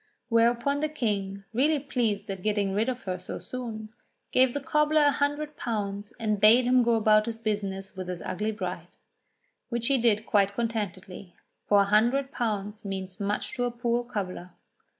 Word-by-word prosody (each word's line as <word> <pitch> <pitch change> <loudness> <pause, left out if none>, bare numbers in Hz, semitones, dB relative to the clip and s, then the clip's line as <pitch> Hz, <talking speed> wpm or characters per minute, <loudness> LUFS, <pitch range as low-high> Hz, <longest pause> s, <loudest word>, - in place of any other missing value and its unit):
Whereupon 235 +4 +2
the 305 +1 0
King, 200 -8 -2
really 295 +6 +3
pleased 230 -7 -1
at 190 -1 -6
getting 205 -1 0
rid 220 +5 +1
of 255 0 -4
her 185 -2 -3
so 180 - -6
soon, 225 -4 -6 0.4
gave 255 0 +3
the - - 0
cobbler 300 +2 +2
a 290 - +5
hundred 290 +2 -1
pounds 205 -3 -3
and 215 -2 0
bade 230 +5 +6
him 250 0 +4
go 235 -1 +3
about 215 0 +4
his 230 -1 -3
business 200 -3 -3
with 185 -1 -6
his 180 -1 -5
ugly 210 +4 -2
bride. 215 - -5 0.8
Which 235 0 0
he 275 -2 +3
did 220 -2 +2
quite 200 -2 +2
contentedly, 200 -5 -4 0.3
for 205 -1 +5
a - - +3
hundred 240 +7 +2
pounds 215 -3 -3
means 190 -1 -5
much 205 +1 -2
to 245 - +1
a - - 0
poor 240 0 -1
cobbler. 185 -6 -5
220 Hz, 175 wpm, -27 LUFS, 200-245 Hz, 0.8 s, bade